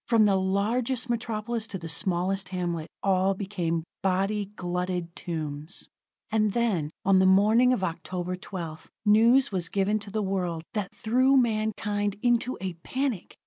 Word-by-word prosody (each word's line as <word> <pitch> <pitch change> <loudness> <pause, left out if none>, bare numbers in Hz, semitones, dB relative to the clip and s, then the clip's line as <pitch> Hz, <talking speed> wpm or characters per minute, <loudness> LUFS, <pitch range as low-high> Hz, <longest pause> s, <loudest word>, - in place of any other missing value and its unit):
From 225 -3 +5
the 200 -2 +4
largest 230 +6 0
metropolis 230 -1 -2
to 195 - -5
the 165 -2 -7
smallest 185 +3 0
hamlet, 175 -3 -2 0.2
all 190 0 +2
became 180 -5 -2 0.2
body 195 +2 +1
glutted 180 -1 -3
tombs. 155 -1 -5 0.4
And 215 -2 +2
then, 205 -11 +1 0.2
on 195 -1 +5
the 190 - +5
morning 215 +6 +5
of 245 -7 0
October 180 +1 -3
12th, 170 -4 -7 0.2
news 230 +6 +5
was 175 -4 -1
given 200 +2 +1
to 205 0 -9
the 215 +1 -1
world 180 -4 -2
that 205 -3 -2
threw 255 +5 +3
mankind 215 -3 0
into 240 +1 +2
a 185 -1 -3
panic. 260 -6 -3
195 Hz, 145 wpm, -27 LUFS, 180-220 Hz, 0.4 s, From